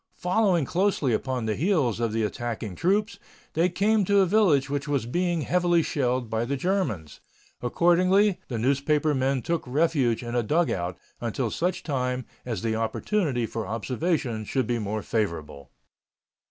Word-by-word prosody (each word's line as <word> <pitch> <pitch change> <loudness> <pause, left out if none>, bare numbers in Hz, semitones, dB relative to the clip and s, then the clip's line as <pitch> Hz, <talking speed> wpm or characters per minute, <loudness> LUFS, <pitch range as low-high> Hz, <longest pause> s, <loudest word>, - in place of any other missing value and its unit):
Following 180 -4 +2
closely 175 - +1
upon 125 +1 -1
the 110 - 0
heels 155 - +1
of 115 -2 0
the 110 0 0
attacking 110 -1 -3
troops, 205 - 0 0.3
they 170 +3 +2
came 205 +4 +2
to 200 +1 +4
a - - +4
village 175 -9 +3
which 140 0 -3
was 140 -5 0
being 175 +5 0
heavily 175 +1 +2
shelled 125 -4 -1
by 110 +1 -1
the 140 +4 -2
Germans. 130 - -2 0.4
Accordingly, 185 - +3
the 120 - -3
newspaper 140 +5 +1
men 130 -1 0
took 170 -1 0
refuge 135 -4 +1
in 120 0 -5
a 120 - +2
dugout 105 - 0 0.2
until 120 0 -2
such 180 +1 -1
time 125 -3 -2 0.2
as 115 -7 -3
the 110 -1 0
opportunity 125 - 0
for 110 -2 -4
observation 120 - -1
should 130 +4 -1
be 120 +1 -1
more 105 0 -3
favorable. 85 -10 -3
135 Hz, 155 wpm, -26 LUFS, 115-175 Hz, 0.4 s, to